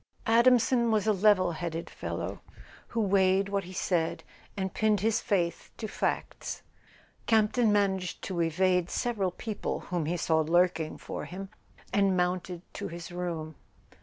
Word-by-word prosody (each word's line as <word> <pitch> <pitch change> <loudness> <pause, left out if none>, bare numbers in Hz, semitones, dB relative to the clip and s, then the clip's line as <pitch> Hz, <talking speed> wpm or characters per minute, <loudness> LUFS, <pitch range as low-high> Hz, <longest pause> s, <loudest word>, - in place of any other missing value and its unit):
Adamson 235 +1 +4
was 215 -2 +2
a 215 - +4
level¬ 195 -3 +4
headed 165 0 -4
fellow, - - -5 0.5
who 230 - -3
weighed 195 -1 +3
what 200 -2 -1
he 180 - -9
said 175 -3 -1 0.3
and 190 -1 -2
pinned 215 -3 +2
his 220 +1 +2
faith 175 -5 -1
to 220 - -4
facts. - - -3 0.6
Campton 220 +1 +3
managed 190 -3 0
to 180 -3 -2
evade 180 +2 +2
several 215 -6 0
people 210 +4 -4
whom 170 -4 0
he 175 +2 0
saw 160 -1 +2
lurking 165 0 +2
for - - -6
him, 195 +2 -7 0.4
and 195 -2 +3
mounted 180 0 -1
to - - -4
his 170 0 -8
room. 170 -3 -4
185 Hz, 145 wpm, -29 LUFS, 175-210 Hz, 0.6 s, Adamson